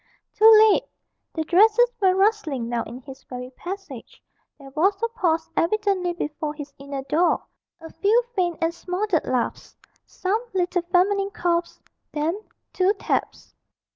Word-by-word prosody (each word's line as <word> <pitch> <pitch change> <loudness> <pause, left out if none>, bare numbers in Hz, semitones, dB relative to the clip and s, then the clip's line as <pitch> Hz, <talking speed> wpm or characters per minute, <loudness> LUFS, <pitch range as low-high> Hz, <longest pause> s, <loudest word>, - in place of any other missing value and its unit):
Too 440 +1 +7 0.2
late! - - +1 0.5
the 320 - -1
dresses 440 +8 +4
were 375 -1 +4
rustling 380 - +1
now 235 0 -1
in 245 +3 -9
his 270 +1 -12
very 250 0 -8
passage; 355 - -9 0.4
there 275 -2 -13
was 370 +8 +2
a - - +3
pause 330 -7 0
evidently 385 0 +1
before 300 -2 -4
his 290 -1 -9
inner 275 -1 -6
door, 325 +6 +1 0.4
a 325 0 -11
few 445 +4 +2
faint 350 -4 0
and 330 +1 +1
smothered 360 0 -2
laughs, 250 -2 -2 0.3
some 395 +4 -2
little 355 0 +1
feminine 395 +2 +2
coughs, 345 -3 -1 0.3
then 320 +7 -1 0.3
two 375 +2 +2
taps. 405 - -3
350 Hz, 140 wpm, -23 LUFS, 295-395 Hz, 0.5 s, Too